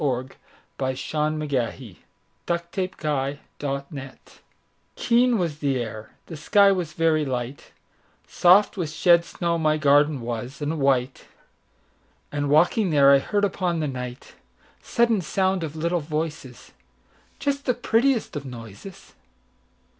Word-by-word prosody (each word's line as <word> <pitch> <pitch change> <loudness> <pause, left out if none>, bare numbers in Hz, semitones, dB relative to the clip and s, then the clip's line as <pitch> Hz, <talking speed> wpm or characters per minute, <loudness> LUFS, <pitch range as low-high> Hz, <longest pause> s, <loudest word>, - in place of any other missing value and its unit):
Philip 130 -2 -2 0.5
Bourke 130 - 0 0.2
Marston 155 0 0
1850–87 170 - -5 0.6
Garden 140 +1 -4
Fairies 135 0 -8 0.8
KEEN 245 0 +3
was 165 -6 -2
the 140 -3 0
air, 110 -2 -6 0.2
the 165 - -8
sky 200 +6 +4
was 175 -5 -2
very 160 -2 +2
light, 130 0 -5 0.6
Soft 190 +4 +4
with 170 -5 -2
shed 170 +2 +4
snow 170 0 -2
my 155 -1 +2
garden 145 -1 +3
was, 120 +3 -5
and 150 +2 -2
white, 130 -2 0 1.1
And, 145 -1 -2
walking 175 +7 +3
there, 140 -3 +5
I 140 - +6
heard 205 +8 0
upon 180 -3 -1
the 155 - -1 1.0
nightSudden 235 -4 +2
sound 185 +2 0
of 155 -1 -5
little 170 +2 0
voices, 150 -4 -5 0.7
Just 280 -1 -2
the 250 - +1
prettiest 245 -1 +1
of 145 - -4
noises. 125 - -11
155 Hz, 125 wpm, -24 LUFS, 140-180 Hz, 1.1 s, I